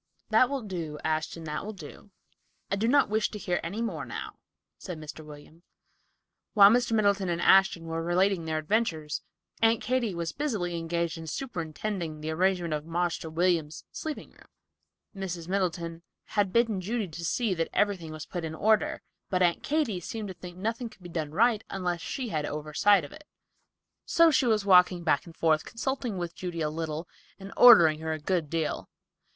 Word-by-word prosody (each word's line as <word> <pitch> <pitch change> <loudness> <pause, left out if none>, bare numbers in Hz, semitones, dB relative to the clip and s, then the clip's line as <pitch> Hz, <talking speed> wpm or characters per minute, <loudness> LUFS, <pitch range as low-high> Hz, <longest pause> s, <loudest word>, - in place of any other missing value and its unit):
"That 230 +3 +5
will 275 -3 -3
do, 170 -7 -5
Ashton; 160 +1 -2
that 150 -1 -4
will 215 +2 -6
do. 200 +1 -12 0.6
I - - +3
do 215 +3 0
not 280 +3 +4
wish 215 +1 +1
to 210 - -7
hear 180 -3 -1
any 200 +8 -3
more 230 - -3
now," - - -7 0.4
said 180 -4 -6
Mr. 155 0 -9
William. 150 +2 -13 0.9
While 200 -1 +9
Mr. 240 0 +2
Middleton 200 -3 +2
and 170 -1 -1
Ashton 190 -2 +4
were 165 0 -3
relating 175 +1 +1
their 160 -1 -1
adventures, 155 -4 -1 0.4
Aunt 225 0 +4
Katy 240 -6 -1
was 170 -1 -3
busily 210 -13 -2
engaged 170 0 -2
in 160 - -8
superintending 170 - -4
the 155 +1 -4
arrangement 175 -1 +1
of 150 -1 -2
"Marster 165 0 -2
William's" 165 -2 0
sleeping 310 -1 -6
room. - - -20 0.7
Mrs. 180 -4 -5
Middleton 170 -3 -2 0.3
had 205 -3 +1
bidden 225 -4 +2
Judy 215 +2 -2
to 170 +2 -8
see 215 +4 0
that 165 -2 -2
everything 190 -6 0
was 155 -1 -7
put 175 -2 -5
in 160 -1 -4
order, 215 +4 +1 0.3
but 185 -2 +2
Aunt 175 -1 +2
Katy 285 - 0
seemed 220 +1 -5
to - - -5
think 180 0 -11
nothing 225 +4 -3
could 190 - -19
be 175 - -8
done 160 -3 -3
right 220 +6 +2
unless 180 -3 -2
she 255 +5 -4
had 155 -5 -1
an - - -4
oversight 155 +5 +2
of - - -12
it. 305 - -13 0.8
So 335 -1 +5
she 260 -3 +3
was 215 -3 +2
walking 180 -2 +5
back 155 0 +1
and 165 - -13
forth, 155 -2 +2
consulting 245 -3 -3
with 175 -1 -4
Judy 175 -2 -5
a 150 -1 0
little 160 +1 -4 0.3
and 195 0 -9
ordering 170 -11 +8
her 160 0 -2
a 155 - -4
good 165 -1 -1
deal. 165 -1 -2
180 Hz, 185 wpm, -28 LUFS, 165-210 Hz, 0.9 s, While